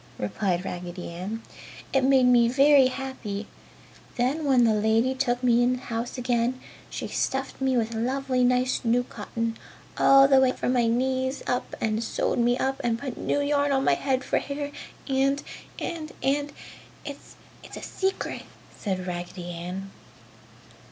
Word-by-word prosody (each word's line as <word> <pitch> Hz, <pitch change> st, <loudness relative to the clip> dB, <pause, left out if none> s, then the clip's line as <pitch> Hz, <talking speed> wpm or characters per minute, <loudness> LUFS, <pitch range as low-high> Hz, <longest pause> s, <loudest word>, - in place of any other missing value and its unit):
replied 175 Hz, -, -1 dB
Raggedy 180 Hz, 0 st, -6 dB
Ann, 200 Hz, +7 st, -5 dB, 0.5 s
"It 270 Hz, -1 st, +3 dB
made 265 Hz, -1 st, +5 dB
me 240 Hz, -1 st, +5 dB
very 275 Hz, +1 st, +6 dB
happy. 255 Hz, -6 st, -5 dB, 0.7 s
Then 270 Hz, +6 st, 0 dB
when 260 Hz, -3 st, +4 dB
the 225 Hz, -2 st, +4 dB
lady 220 Hz, +4 st, +2 dB
took 255 Hz, -2 st, -1 dB
me 240 Hz, -1 st, +4 dB
in 245 Hz, +1 st, +3 dB
the 255 Hz, -, -5 dB
house 230 Hz, +3 st, -4 dB
again 245 Hz, 0 st, 0 dB, 0.3 s
she -, -, -5 dB
stuffed 270 Hz, 0 st, -2 dB
me 265 Hz, -1 st, +2 dB
with 230 Hz, 0 st, 0 dB
lovely 255 Hz, +2 st, 0 dB
nice 250 Hz, +1 st, +2 dB
new 240 Hz, +1 st, +2 dB
cotton, 230 Hz, -2 st, -4 dB, 0.4 s
all 275 Hz, 0 st, +7 dB
the 270 Hz, -1 st, +6 dB
way 260 Hz, -1 st, +4 dB
from 250 Hz, -, -1 dB
my 240 Hz, -2 st, +3 dB
knees 260 Hz, +3 st, 0 dB
up 250 Hz, -, -2 dB
and 220 Hz, +1 st, 0 dB
sewed 230 Hz, -, -1 dB
me 240 Hz, +1 st, +3 dB
up 270 Hz, 0 st, -1 dB
and 235 Hz, -1 st, +1 dB
put 255 Hz, 0 st, -5 dB
new 285 Hz, -, -1 dB
yarn 285 Hz, 0 st, +1 dB
on 270 Hz, -1 st, +2 dB
my -, -, +4 dB
head 265 Hz, -2 st, 0 dB
for -, -, +1 dB
hair 285 Hz, 0 st, -4 dB, 0.4 s
and 275 Hz, +1 st, +1 dB, 0.3 s
and 320 Hz, -3 st, -5 dB
and 285 Hz, +2 st, +1 dB, 0.5 s
it's 285 Hz, -1 st, -9 dB, 0.4 s
a -, -, -8 dB
secret!" 385 Hz, 0 st, -2 dB, 0.3 s
said 185 Hz, -3 st, -3 dB
Raggedy 175 Hz, 0 st, -5 dB
Ann. 180 Hz, +3 st, -6 dB
250 Hz, 160 wpm, -26 LUFS, 225-270 Hz, 0.7 s, all